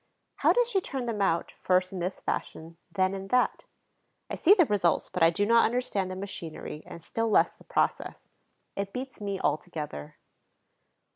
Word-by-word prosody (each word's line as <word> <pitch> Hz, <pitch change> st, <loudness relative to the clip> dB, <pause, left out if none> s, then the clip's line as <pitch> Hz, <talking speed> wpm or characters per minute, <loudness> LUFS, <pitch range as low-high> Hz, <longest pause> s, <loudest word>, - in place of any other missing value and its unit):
How -, -, +4 dB
does 485 Hz, -1 st, +3 dB
she 395 Hz, -6 st, +1 dB
turn 265 Hz, -7 st, -4 dB
them 225 Hz, -4 st, -2 dB
out, 170 Hz, -4 st, +1 dB
first 185 Hz, 0 st, +2 dB
in 185 Hz, -, -4 dB
this 180 Hz, +2 st, -3 dB
fashion, 165 Hz, +1 st, -4 dB
then 190 Hz, -1 st, +1 dB
in 195 Hz, 0 st, -5 dB
that? 250 Hz, +4 st, +1 dB, 0.7 s
I -, -, -1 dB
see 390 Hz, +5 st, +6 dB
the 350 Hz, -5 st, +5 dB
results, 195 Hz, -, +1 dB
but 180 Hz, -, -2 dB
I 165 Hz, -, +7 dB
do 185 Hz, +5 st, 0 dB
not 230 Hz, +2 st, +5 dB
understand 225 Hz, -6 st, 0 dB
the 185 Hz, -, -5 dB
machinery 170 Hz, -5 st, -7 dB
and 170 Hz, -, -10 dB
still 225 Hz, +5 st, -1 dB
less -, -, +4 dB
the -, -, -21 dB
process. -, -, -1 dB, 0.5 s
It 200 Hz, 0 st, -4 dB
beats 260 Hz, -2 st, -6 dB
me 200 Hz, -2 st, -3 dB
altogether. 150 Hz, -, -3 dB
195 Hz, 175 wpm, -28 LUFS, 175-230 Hz, 0.7 s, I